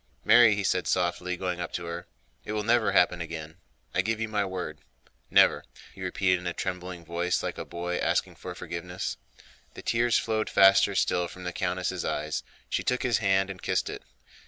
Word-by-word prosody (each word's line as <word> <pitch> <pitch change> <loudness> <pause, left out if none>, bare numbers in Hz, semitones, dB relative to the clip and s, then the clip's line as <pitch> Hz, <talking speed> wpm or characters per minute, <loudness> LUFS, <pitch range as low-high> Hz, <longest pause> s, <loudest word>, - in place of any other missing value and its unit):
"Mary," 115 -1 +7
he 105 - -2
said 90 -1 +1
softly, 90 0 0
going 90 -1 -2
up 85 - -4
to 85 - -4
her, 85 +1 -6 0.4
"it 105 - -5
will 105 0 -1
never 115 +1 +3
happen 90 -1 +3
again; 80 -1 -6 0.4
I 90 - +3
give 110 +3 -1
you 115 - -1
my 105 -1 0
word. 95 -2 -5 0.5
Never," - - +5 0.3
he - - -12
repeated 90 -2 +1
in 90 - -6
a 85 - -1
trembling 90 -1 -5
voice 85 +2 -1
like - - -4
a - - -4
boy 90 +1 -3
asking - - 0
for - - -7
forgiveness. 90 +2 -5 0.6
The - - -9
tears 115 0 +2
flowed 110 -1 -1
faster 100 0 +6
still 90 -2 +1
from 90 +2 -11
the 90 0 -4
countess' 90 0 -2
eyes. - - -2 0.3
She - - -1
took 125 - 0
his 120 -3 +2
hand 95 -2 +2
and 90 - -10
kissed - - 0
it. - - -7
90 Hz, 195 wpm, -28 LUFS, 90-105 Hz, 0.6 s, Mary